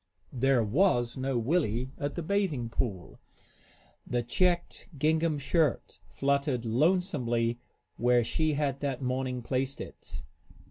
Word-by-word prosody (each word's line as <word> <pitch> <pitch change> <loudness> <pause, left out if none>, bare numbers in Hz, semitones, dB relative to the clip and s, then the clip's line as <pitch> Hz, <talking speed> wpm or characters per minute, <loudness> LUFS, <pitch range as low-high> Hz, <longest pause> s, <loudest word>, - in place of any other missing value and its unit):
There 130 -1 +3
was 120 - +2
no 130 -1 -1
Willie 125 -2 0
at 145 0 -3
the 170 - -3
bathing 160 - 0
pool. 100 -7 -3 0.9
The 120 -1 0
checked 175 +11 0
gingham 155 +2 +2
shirt 145 0 0
fluttered 140 -3 0
lonesomely 120 - +1 0.4
where 120 0 +3
she 155 +6 0
had 140 -2 -1
that 135 -2 -3
morning 125 -1 -2
placed 130 +2 -2
it. - - -9
135 Hz, 120 wpm, -29 LUFS, 120-155 Hz, 0.9 s, There